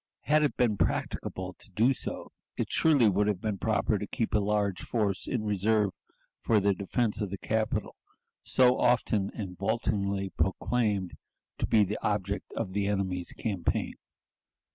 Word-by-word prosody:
Had 155 +1 +3
it 150 - 0
been 115 -5 +2
practicable 95 +1 -2
to - - -10
do 115 +7 +3
so, - - -6 0.3
it - - 0
would - - -3
surely 110 - +4
have 100 -4 -1
been 105 -2 -3
proper - - +1
to - - -4
keep - - -2
a 105 - +4
large 100 -2 0
force 105 -5 -1
in 120 -4 -1
reserve 105 0 +2 0.5
for 110 -2 +3
the 100 0 +2
defense 105 +3 -1
of 105 - -1
the 100 - -5
capital, 110 +1 -1 0.5
so 125 -1 +3
often 105 -5 +2
and 95 -4 -5
vauntingly 100 -2 -1
proclaimed 100 -2 0 0.5
to - - 0
be 110 -2 +5
the 105 +2 -2
object 100 -1 -2
of 100 -5 -3
the 100 0 0
enemy's 95 -3 -1
campaign. 95 -8 -2
105 Hz, 160 wpm, -29 LUFS, 100-110 Hz, 0.5 s, be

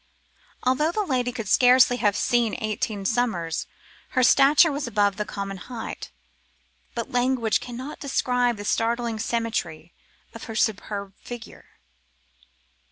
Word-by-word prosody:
Although 280 +6 +2
the 425 +4 -1
lady 250 -5 0
could 230 -4 -6
scarcely 250 +3 +5
have 205 -4 +2
seen 235 -2 +1
eighteen 215 -2 -3
summers, 190 -8 -1 0.5
her 255 - +5
stature 285 +5 +6
was 285 -2 -3
above 205 -3 +1
the 210 - -2
common 200 -1 -5
height; 230 +4 -7 0.9
but 235 -1 -4
language 245 -3 +1
cannot 250 +4 -7
describe 250 -4 0
the 205 - -7
startling 230 0 0
symmetry 210 -9 -3 0.4
of 230 - -9
her 225 - -7
superb 200 -2 -1
figure. 240 -1 -10
235 Hz, 125 wpm, -24 LUFS, 210-250 Hz, 0.9 s, stature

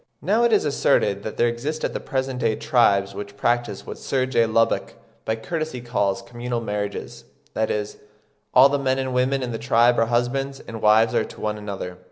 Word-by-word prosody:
Now 220 +4 +2
it 235 - +3
is 215 - +3
asserted 105 -8 +2
that 110 - -6
there 120 - +3
exist 140 +7 -3
at - - -1
the - - -3
present 130 -1 -3
day 115 -2 +1
tribes 100 -6 +2
which 100 0 -8
practise 120 -4 -1
what - - -8
Sir 130 -2 0
J. 120 -3 +2
Lubbock 115 +1 +1 0.3
by 110 - 0
courtesy 155 +4 -4
calls 110 -5 -1
communal 120 0 -4
marriages; 105 -2 -5 0.3
that 110 - 0
is, 105 -1 -3 0.5
all 130 +2 +8
the 140 0 0
men 130 -1 +1
and 130 -1 -2
women 130 +1 +1
in 125 - -3
the 115 - -4
tribe 120 0 +3
are 115 - +3
husbands 135 +3 -1
and 115 -1 -9
wives 110 +1 +4
to - - -2
one 105 0 -2
another. 95 -3 -6
120 Hz, 200 wpm, -23 LUFS, 105-130 Hz, 0.5 s, all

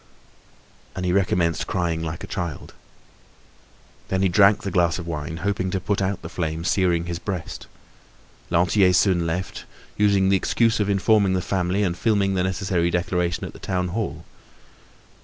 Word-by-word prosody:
And 90 - -3
he 90 - +1
recommenced 90 -4 +1
crying 85 -2 -1
like 80 0 -5
a - - -7
child. 85 -6 -5 1.3
Then 95 0 0
he 95 - +3
drank 100 +3 +4
the 100 - -3
glass 85 -2 +2
of 85 - -6
wine, 80 -1 -4
hoping 95 -2 0
to 95 - -1
put 100 +2 -1
out 95 -1 -2
the - - -5
flame 80 -2 -3
searing 90 -2 +1
his 85 0 -4
breast. 95 -4 -5 0.8
Lantier 90 +2 +3
soon 90 -2 +3
left, 90 +3 -4 0.3
using 100 -2 +3
the 95 - +4
excuse 115 +4 +1
of 105 -1 0
informing 100 0 +3
the 95 - +1
family 95 +2 0
and 90 -3 0
filing 100 -1 +1
the 95 - 0
necessary 95 -2 0
declaration 90 0 -1
at - - -8
the - - -13
town 90 -1 -2
hall. 85 -6 -4
90 Hz, 165 wpm, -23 LUFS, 85-100 Hz, 1.3 s, drank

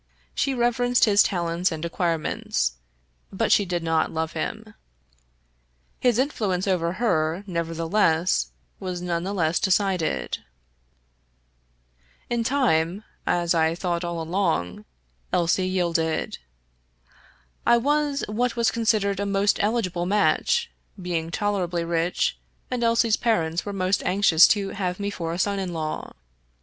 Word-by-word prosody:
She 275 -1 0
reverenced 245 0 +2
his 205 -1 +5
talents 175 -1 0
and 160 0 -4
acquirements, 165 - -1 0.6
but - - 0
she 205 - +5
did 175 -2 -2
not 165 -1 +1
love 160 0 -2
him. - - -5 1.3
His 245 -3 +2
influence 210 -9 0
over 175 -3 +1
her, 175 -5 0
nevertheless, 165 - +1 0.3
was 180 -1 -4
none 175 -1 -2
the 195 - -3
less 170 -4 +1
decided. 185 - 0 1.9
In 235 -1 +1
time 210 - +1
— - - -42
^as 175 -1 +2
I 160 0 +2
thought 175 -1 -2
all 170 -1 -3
along 160 - -1 0.2
— - - -41
Elsie 175 +2 +1
yielded. 170 -3 -1 1.2
I 235 - +5
was 290 +2 0
what 235 +3 -1
was 235 -1 +2
considered 215 -4 +1
a 200 - -1
most 200 +1 +2
eligible 195 -5 0
match, 470 - +2 0.3
being 170 -3 -3
tolerably 180 -3 -1
rich, 170 +1 0 0.3
and 245 -1 -1
Elsie's 230 -1 +3
parents 175 -7 0
were - - -2
most 190 0 0
anxious 185 -3 +5
to 200 -2 +1
have 180 -2 -3
me 200 0 -2
for 165 -4 -4
a 170 - -3
son 200 +1 0
in 185 -2 -3
law. 155 -2 -4
185 Hz, 135 wpm, -24 LUFS, 165-210 Hz, 1.9 s, his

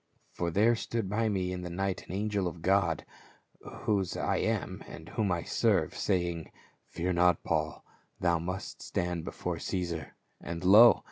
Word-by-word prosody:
For 85 - -2
there 110 +7 +4
stood 115 -2 -3
by 110 +1 +1
me 95 -3 -1
in 90 0 -4
the 90 - -5
night 95 +2 -2
the 90 - -5
angel 100 -2 0
of 85 -1 -7
God, 95 -4 +2 0.8
whose 100 -4 0
I - - 0
am - - -1
and 85 +1 -10
whom 105 -2 0
I 85 -2 0
serve, - - +1
saying, 85 -4 -1 0.4
Fear 90 +1 -2
not 90 0 +3
Paul; 80 -2 -1 0.3
thou 85 -2 +2
must 90 +3 -5
stand 85 -1 -2
before - - -4
Caesar; 85 -5 -3 0.3
and 85 +2 -5
lo 105 +6 +8
90 Hz, 160 wpm, -30 LUFS, 85-100 Hz, 0.8 s, lo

